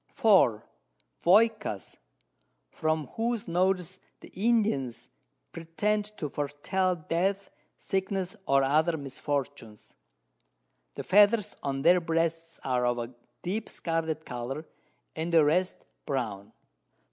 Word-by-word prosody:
4. 185 Hz, -, +3 dB, 0.6 s
Voycas, 210 Hz, -, +2 dB, 0.8 s
from 155 Hz, -1 st, -1 dB
whose 230 Hz, -1 st, -1 dB
Notes 185 Hz, +1 st, 0 dB, 0.2 s
the -, -, -12 dB
Indians 180 Hz, -, 0 dB, 0.4 s
pretend 205 Hz, +6 st, -1 dB
to 150 Hz, -, -3 dB
foretel 150 Hz, +7 st, -1 dB
Death, 195 Hz, +4 st, 0 dB, 0.3 s
Sickness, 190 Hz, 0 st, -2 dB
or 135 Hz, 0 st, +4 dB
other 155 Hz, +4 st, +2 dB
Misfortunes; 140 Hz, -5 st, -5 dB, 1.0 s
the -, -, -5 dB
Feathers 205 Hz, +1 st, +4 dB
on 135 Hz, -1 st, -2 dB
their 175 Hz, +2 st, +5 dB
Breasts 165 Hz, 0 st, -1 dB
are 125 Hz, -2 st, 0 dB
of 120 Hz, 0 st, +1 dB
a 120 Hz, +1 st, -5 dB, 0.3 s
deep 205 Hz, +5 st, -3 dB
scarlet 160 Hz, -2 st, -2 dB
Colour, 130 Hz, +5 st, -5 dB, 0.5 s
and 160 Hz, +2 st, -3 dB
the 165 Hz, -3 st, +6 dB
rest 180 Hz, +5 st, 0 dB, 0.2 s
brown. 110 Hz, -8 st, -3 dB
165 Hz, 105 wpm, -28 LUFS, 140-190 Hz, 1.0 s, the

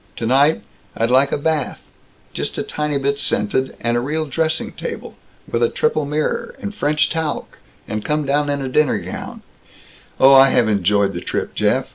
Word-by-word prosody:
Tonight, 135 Hz, +7 st, +2 dB, 0.3 s
I'd 115 Hz, +2 st, +1 dB
like 135 Hz, +2 st, +4 dB
a -, -, +1 dB
bath, 150 Hz, -1 st, -1 dB, 0.5 s
just -, -, -3 dB
a -, -, -1 dB
tiny 150 Hz, -1 st, -2 dB
bit 140 Hz, +1 st, -1 dB
scented, 130 Hz, -9 st, 0 dB
and 120 Hz, 0 st, 0 dB
a -, -, +2 dB
real 155 Hz, +5 st, -2 dB
dressing 160 Hz, +3 st, -1 dB
table -, -, -7 dB, 0.3 s
with 115 Hz, -, -2 dB
a 120 Hz, -, +3 dB
triple 155 Hz, -1 st, 0 dB
mirror, 150 Hz, +1 st, -2 dB
and 210 Hz, -4 st, -5 dB
French 150 Hz, -6 st, +1 dB
talc, 160 Hz, -2 st, -3 dB, 0.3 s
and 105 Hz, 0 st, -4 dB
come 150 Hz, -1 st, -1 dB
down 145 Hz, +1 st, +1 dB
in 140 Hz, -1 st, -1 dB
a -, -, -3 dB
dinner 150 Hz, +2 st, +2 dB
gown -, -, -7 dB, 0.8 s
Oh, 135 Hz, +1 st, +7 dB
I 135 Hz, 0 st, +8 dB
have 120 Hz, -3 st, +3 dB
enjoyed 100 Hz, -1 st, +2 dB
the 85 Hz, -, -5 dB
trip, -, -, -3 dB
Jeff. -, -, +1 dB
140 Hz, 180 wpm, -19 LUFS, 125-150 Hz, 0.8 s, I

